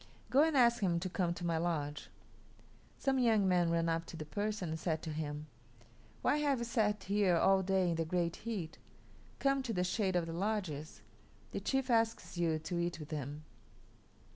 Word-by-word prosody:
Go 270 +3 +6
and 315 -2 +3
ask 235 -2 +5
him 175 -4 +2
to 185 - -2
come 180 -2 0
to 175 - -5
my 165 -1 +1
lodge." 150 -4 -2 0.9
Some 270 -1 +1
young 220 -5 +4
men 175 -2 +3
ran 165 0 +1
up 165 0 -1
to 165 - -8
the 155 - -5
person 205 +3 -2
and 160 0 -3
said 160 -2 -1
to 160 - -4
him, 150 -1 -4 0.8
"Why 290 - +3
have 290 -2 +2
you 235 - -3
sat 210 -3 +1
here 195 -3 +2
all 195 +2 +4
day 190 -1 +2
in 165 - -1
the 165 - +1
great 170 0 -1
heat? 200 -9 -5 0.6
Come 275 0 +2
to 250 -3 -3
the 180 -2 +1
shade 190 0 0
of 175 -2 +2
the 165 - -5
lodges. 170 - -3 0.5
The - - -3
chief 265 +5 0
asks 225 -3 +1
you 165 -2 +1
to 170 +3 -3
eat 170 -1 -2
with 150 +1 -9
him." 145 0 -4
180 Hz, 195 wpm, -34 LUFS, 165-220 Hz, 0.9 s, Go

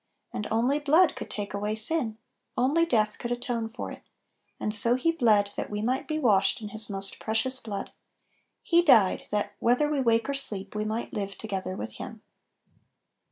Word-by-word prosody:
And 210 - -3
only 245 +6 +2
blood 310 +4 +4
could - - -7
take 205 -1 -5
away 210 +1 -2
sin, 225 -1 0 0.4
only 295 +7 +3
Little - - -15
Pillows 215 -1 +4
57 - - -20
death - - -16
could 240 - -4
atone 240 -2 -2
for 235 - -6
it; - - -10 0.6
and 210 - -1
so 230 +3 +5
He 275 +6 +2
bled, 215 -9 +3
that - - -4
we 210 0 -3
might 255 +3 -1
be 310 - -1
washed 215 -10 +3
in 215 -2 -6
His 215 +1 -1
most 195 -1 -5
precious 225 +4 0
blood; 205 -5 -5 0.7
He 340 0 +4
died, 225 - +4
"that, 205 0 -1
whether 250 +5 +3
we 295 -2 0
wake 230 -2 +2
or 280 - -1
sleep, 205 -8 -1
we 210 0 -2
might 220 +2 -3
live 200 -1 -4
together 190 -3 -4
with 110 - -6
Him." - - -8
225 Hz, 200 wpm, -27 LUFS, 210-260 Hz, 0.7 s, so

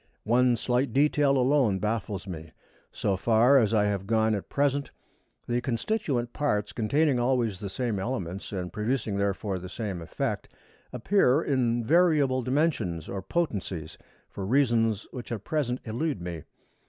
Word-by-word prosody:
One 120 +2 +3
slight 125 +1 0
detail 145 0 +3
alone 130 -6 +3
baffles 105 -2 -2
me. 80 -4 -8 0.4
So 100 - -1
far 115 +7 +4
as 110 -4 +2
I 105 -2 +3
have 100 -2 -2
gone 110 0 +2
at 100 - -4
present, 140 0 0 0.6
the 120 0 0
constituent 125 - -1
parts, 105 -8 -1
containing 140 +4 +2
always 120 -5 +1
the 100 - -5
same 110 0 -2
elements 95 -4 -4
and 90 -3 -4
producing, 110 -1 -1
therefore, 100 -1 -1
the 90 +1 -8
same 100 -4 -4
effect, 80 - -3 0.4
appear 140 - +2
in 120 -4 +1
variable 150 -4 +3
dimensions 125 - 0
or 95 - -4
potencies, 95 - -3 0.3
for 100 - -7
reasons 115 -2 +2
which 125 -2 -8
at 110 -4 -4
present 130 -4 -1
elude 125 - -2
me. 85 -2 -6
115 Hz, 145 wpm, -27 LUFS, 100-135 Hz, 0.6 s, far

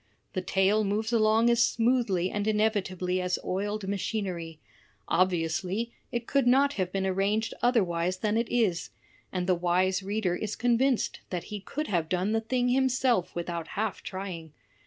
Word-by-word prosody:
The 185 - -1
tale 195 +3 +2
moves 215 +3 -1
along 225 +1 +4
as 235 0 +3
smoothly 230 -8 +1
and 205 0 -2
inevitably 190 -4 0
as 180 0 0
oiled 205 +2 -2
machinery; 185 -5 -3 0.5
obviously, 185 +5 0 0.2
it 240 -2 -2
could 275 -1 +1
not 275 +3 +4
have 185 -2 -2
been 195 0 -1
arranged 200 +4 0
otherwise 185 -7 +1
than 210 +2 0
it 230 +1 0
is; 210 -8 +1 0.4
and 180 -1 -2
the 185 - +3
wise 180 +2 +1
reader 195 -2 -1
is 210 +2 -3
convinced 245 +1 +1
that 180 -2 -3
he 205 - -3
could 295 +10 -4
have 170 - -1
done 185 +3 0
the 225 0 +1
thing 245 +2 0
himself 255 -5 +2
without 170 -1 -3
half 215 -3 -1
trying. 180 -5 -6
200 Hz, 155 wpm, -28 LUFS, 180-230 Hz, 0.5 s, along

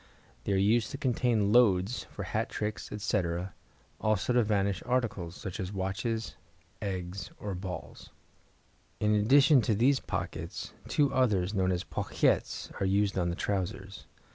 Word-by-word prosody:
They 100 - +1
are - - +3
used 110 +4 +3
to - - -5
contain 120 -6 +1
"loads" 105 -2 +3
for - - -7
hat - - -2
tricks, 105 -3 -4
etc., 90 -3 -1 0.5
also 110 +3 +1
to 120 - +5
vanish 100 -3 +1
articles, 110 -9 -1
such 95 0 -6
as 95 -1 -3
watches, 100 0 -2 0.5
eggs, 95 -2 -4
or 100 -1 -4
balls. 90 0 -7 0.9
In 105 0 +2
addition 135 +6 +6
to 110 -1 +1
these 130 +5 +3
pockets, - - -5
two 145 -2 +2
others, 105 -7 +2
known 95 -2 +1
as 90 -1 -1
pochettes, - - 0
are - - +2
used 100 +1 +2
on 85 -2 +1
the 85 - -2
trousers. 95 0 -3
100 Hz, 145 wpm, -30 LUFS, 95-115 Hz, 0.9 s, addition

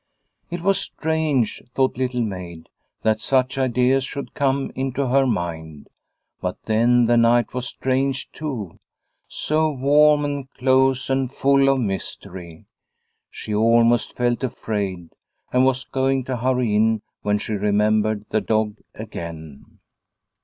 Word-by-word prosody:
It 175 0 -5
was 195 +2 +2
strange, 160 - -1
thought 130 -1 +2
Little 125 -1 -1
Maid, 90 -6 -7 0.3
that 110 0 +1
such 130 +1 +1
ideas 130 +1 +2
should 140 +1 -6
come 140 -1 0
into 130 0 -2
her 135 +1 +3
mind. 80 - -4 0.5
But - - -3
then 120 +2 +3
the 120 +1 +3
night 120 0 +3
was 125 0 -3
strange 130 +2 -1
too, 125 - -6 0.5
so 155 +1 0
warm 145 +2 +4
and 140 -2 -4
close 130 0 +2
and 135 -1 0
full 140 0 +3
of 135 -1 +2
mystery. 90 -4 -6 0.6
She 105 - -6
almost 115 +2 +3
felt 120 +1 0
afraid 100 -8 -3 0.4
and 125 +1 +4
was 130 0 +1
going 135 0 0
to 130 0 -3
hurry 125 -2 0
in, 110 0 +2 0.2
when 105 0 +1
she 110 - -4
remembered 105 +1 +1
the 110 - +1
dog 110 -1 0 0.2
again. 80 -4 -9
125 Hz, 130 wpm, -22 LUFS, 105-135 Hz, 0.6 s, warm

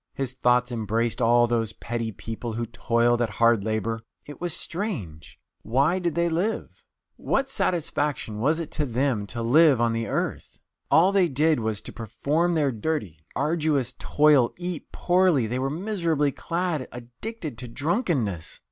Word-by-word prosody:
"His 135 -2 -3
thoughts 125 -1 +2
embraced 115 +1 -1
all 120 +1 +5
those 115 -2 -1
petty 115 -1 -4
people 115 +2 -6
who 115 +1 -2
toiled 115 +1 +1
at 115 - +1
hard 115 0 +3
labour. 110 +1 -2 0.2
It 145 - -11
was 175 -1 -1
strange 160 - -5 0.2
why 140 +10 +2
did 170 -4 -1
they 170 0 +2
live? 180 +7 -2 0.4
What 275 0 0
satisfaction 150 - -1
was 155 +8 +2
it 165 - -5
to 150 -2 -1
them 120 -4 0
to 115 +2 -4
live 145 +2 +5
on 115 -1 +2
the 115 -1 -2
earth? - - -3 0.3
All 180 +4 +5
they 195 -3 +4
did 155 +1 +3
was 110 -2 -2
to - - -8
perform 150 +10 0
their 145 -4 +2
dirty, 110 - -3 0.2
arduous 150 -6 0
toil, 145 -5 +4
eat 175 -2 -5
poorly; 175 -8 +3
they 125 +3 -2
were 135 +1 0
miserably 165 -4 0
clad, 165 -3 -2
addicted 125 - -7
to 125 - -5
drunkenness. 135 - -1
130 Hz, 155 wpm, -25 LUFS, 115-165 Hz, 0.4 s, all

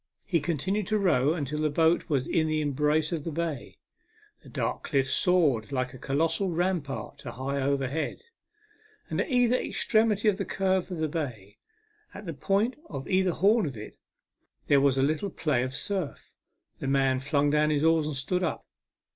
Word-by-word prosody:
He 175 -5 +1
continued 175 +7 -1
to 215 - +1
row 155 -7 +2
until 150 -2 -3
the 155 0 +1
boat 165 +4 +2
was 140 -4 +1
in 160 -1 +1
the 155 0 0
embrace 150 +2 +1
of 165 -4 -2
the 165 - -4
bay. 160 -4 -4 0.6
The - - -15
dark - - -2
cliffs 135 -3 0
soared 150 - +2
like 130 -2 -2
a. 130 - -11
colossal 165 +8 0
rampart 170 -5 -2
to 125 -4 -7
high 135 +3 -3
overhead, 140 - -1 0.9
and - - +1
at - - -3
either 245 -2 +3
extremity 215 -3 +1
of 205 -3 +3
the - - 0
curve 190 -1 0
of 180 - -4
the 160 0 0
bay, 120 - -5 0.6
at 200 - -8
the 165 - -4
point 200 - 0
of 135 -3 -6
either 190 0 +2
horn 200 +3 +3
of 130 -5 -6
it, 105 - -9 0.7
there 140 -1 +4
was 135 -1 +3
a 135 - +3
little 155 +7 0
play 150 -8 0
of 130 +1 -2
surf. 190 -8 -4 0.5
The 135 - -4
man 135 -1 +2
flung 145 +1 +1
in 150 0 +3
his 150 -1 +1
oars 160 -1 +3
and 155 - -3
stood 180 +7 -1
up. 170 - -2
155 Hz, 185 wpm, -28 LUFS, 140-185 Hz, 0.9 s, there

